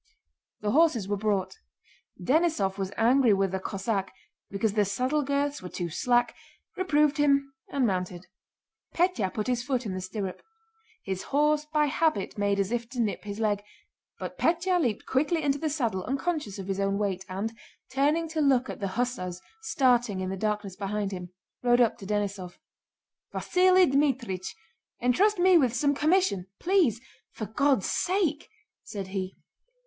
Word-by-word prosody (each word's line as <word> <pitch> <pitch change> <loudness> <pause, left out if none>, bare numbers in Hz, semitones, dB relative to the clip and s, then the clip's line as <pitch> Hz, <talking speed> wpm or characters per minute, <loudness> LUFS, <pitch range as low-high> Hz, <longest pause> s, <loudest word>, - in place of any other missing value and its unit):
The 210 -1 0
horses 280 - +3
were 205 - 0
brought. 205 - -1 0.6
Denísov 265 - +1
was 190 0 -2
angry 240 0 +4
with 195 -1 +1
the 190 - -2
Cossack 195 0 -2 0.4
because 200 +1 -1
the 210 -1 +3
saddle 255 +9 0
girths 285 +1 -1
were 180 - -7
too 175 -1 -4
slack, 240 +7 +2 0.4
reproved 300 -5 +2
him, 280 -1 +2 0.2
and 275 -3 +1
mounted. 180 -3 -2 0.7
Pétya 335 - +1
put 215 - -3
his 250 -1 0
foot 255 -1 -2
in 200 - -3
the 185 - -4
stirrup. 185 0 -5 0.6
His 190 -1 -3
horse 300 +1 +1
by 300 -1 +3
habit 290 - 0
made 200 -1 +1
as 195 +1 0
if 235 -1 -2
to 255 - -7
nip 215 -2 -1
his 205 +1 -5
leg, 210 -2 +1 0.6
but - - -7
Pétya 350 +2 +2
leaped 235 -8 -1
quickly 310 +5 +1
into 285 0 +1
the 315 - -1
saddle 235 - -1
unconscious 275 - -2
of 195 -1 -7
his 195 0 -2
own 195 0 +1
weight 195 -3 -1
and, 200 +5 -3 0.4
turning 295 +5 +2
to 315 0 -1
look 265 -3 +3
at - - -9
the 200 - -2
hussars 210 -8 -2 0.2
starting 245 - +2
in 185 0 -3
the - - -2
darkness 210 -1 -2
behind 200 0 -2
him, 180 -2 -6 0.3
rode 245 0 +4
up 235 -3 +3
to 195 - -9
Denísov. 200 -3 -3 0.8
"Vasíli 365 -2 +4
Dmítrich, 245 -10 0 0.5
entrust 380 - +3
me 360 -1 +6
with 250 -5 +1
some 285 +2 +2
commission! 300 - +2
Please... 350 - +2 0.3
for 215 - -5
God's 260 +1 +1
sake...!" 350 -5 0 0.3
said 195 -3 -7
he. 190 -1 -4
235 Hz, 165 wpm, -27 LUFS, 195-290 Hz, 0.8 s, me